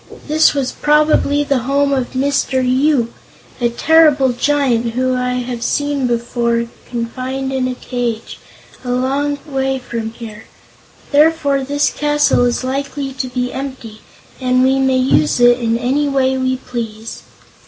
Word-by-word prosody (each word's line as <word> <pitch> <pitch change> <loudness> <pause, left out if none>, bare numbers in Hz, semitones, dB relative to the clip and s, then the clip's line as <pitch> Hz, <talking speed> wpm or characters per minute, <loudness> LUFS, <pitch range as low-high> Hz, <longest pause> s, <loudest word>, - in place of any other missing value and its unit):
This 310 0 +3
was 270 -2 -1
probably 295 -1 +2
the 280 -2 0
home 280 +3 +1
of 260 -2 -2
Mr. 265 -1 0
Yoop, 260 -2 +2 0.5
a 240 -1 +1
terrible 295 +1 +4
giant 245 -3 0
whom 255 0 +1
I 250 0 -1
have 245 -1 -4
seen 285 0 0
confined 240 +2 -3
in 260 -1 0
a 255 - -3
cage, 240 -3 -4 0.4
a 250 - -6
long 275 +3 0
way 270 -2 -1
from 235 -3 -5
here. 225 -2 -10 0.7
Therefore 290 -2 +3
this 285 +2 0
castle 295 -4 +2
is 245 +1 -1
likely 275 +1 -3
to 260 0 -4
be 250 0 -3
empty 260 -5 -7 0.4
and 255 -1 +2
we 265 +1 +3
may 265 -1 +2
use 255 - +2
it 245 0 +5
in 230 -1 0
any 265 +5 0
way 265 -1 +1
we 260 0 0
please." 225 -3 -6
260 Hz, 145 wpm, -17 LUFS, 245-280 Hz, 0.7 s, it